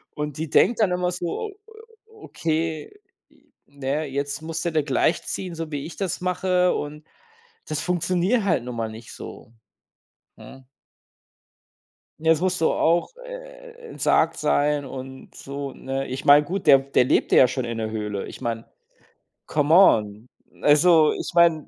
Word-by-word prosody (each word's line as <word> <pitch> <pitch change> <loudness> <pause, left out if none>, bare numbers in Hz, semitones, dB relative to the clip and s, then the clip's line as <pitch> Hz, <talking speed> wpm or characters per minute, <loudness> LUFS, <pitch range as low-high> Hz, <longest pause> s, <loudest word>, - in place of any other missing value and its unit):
Und 150 -1 -4
die 160 -1 -4
denkt 240 - +3
dann 190 -4 +3
immer 180 0 0
so: 180 - -4 0.6
„Okay, 165 - -4 0.4
j - - -28 0.2
na 140 -1 -9
ja, 150 +3 0
jetzt 140 +2 -4
musste 165 +1 -3
der 155 -1 +1
gleichziehen, 165 +5 -1
so 160 -1 -6
wie 145 -1 -4
ich 165 - -9
das 190 -5 -3
mache“ 180 0 +1
und 150 +1 -6 0.6
das 155 0 -3
funktioniert 180 +5 0
halt 170 -10 +1
nun 125 -1 -6
mal 110 -1 -3
nicht 110 +1 -11
so, 115 - -11 0.9
hm? 135 -1 -13 1.6
Ne, 160 - -3
jetzt 160 +1 +2
musst 185 -1 0
du 160 - +3
auch, 170 - +1
äh, - - -10 0.2
entsagt - - +2
sein 145 0 +1
und 130 0 -9
so, 140 0 -7
ne? 135 +1 -4
Ich 130 +2 -6
meine, 145 +1 +7
gut, 185 +3 -4
der 135 - +9
der 135 -2 +1
lebte - - +2
ja 130 - +7
schon 130 0 -3
in 115 -1 -4
der 110 -1 -3
Höhle. 105 -2 -4
Ich - - -11
meine, 115 -2 -3 0.8
come 150 +1 +1
on. 110 - +4 0.3
Also, 155 +1 +5
ich - - -5
meine 170 -3 +3
155 Hz, 160 wpm, -23 LUFS, 135-180 Hz, 1.6 s, der